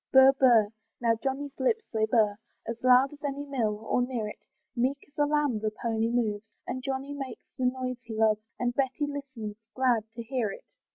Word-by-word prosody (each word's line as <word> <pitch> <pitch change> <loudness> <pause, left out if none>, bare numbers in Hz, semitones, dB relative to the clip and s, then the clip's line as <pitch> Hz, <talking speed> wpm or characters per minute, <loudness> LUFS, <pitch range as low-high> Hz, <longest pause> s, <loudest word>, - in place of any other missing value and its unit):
Burr, 265 0 +9
burr 245 -6 +5 0.3
now 230 -1 +3
Johnny's 275 +1 -3
lips 445 +13 +2
they 220 -1 +2
burr, 215 -3 +3 0.3
As 230 0 -5
loud 255 +2 +6
as 290 - -14
any 285 0 -2
mill, 220 -6 -1
or 250 - +2
near 245 -4 -1
it, - - -10 0.4
Meek 255 +3 +1
as 285 - -31
a 290 - +4
lamb 295 -6 +1
the 215 0 0
pony 225 +1 -1
moves, 220 -3 0 0.2
And 255 - -3
Johnny 270 +1 -3
makes 270 -5 -6
the 255 - -1
noise 255 0 -1
he 230 -2 -7
loves, 215 -1 +3 0.2
And 245 0 0
Betty 275 +3 0
listens, 260 -7 -6 0.2
glad 245 -4 +2
to 235 - -5
hear 235 -2 -1
it. - - -12
250 Hz, 195 wpm, -29 LUFS, 225-270 Hz, 0.4 s, Burr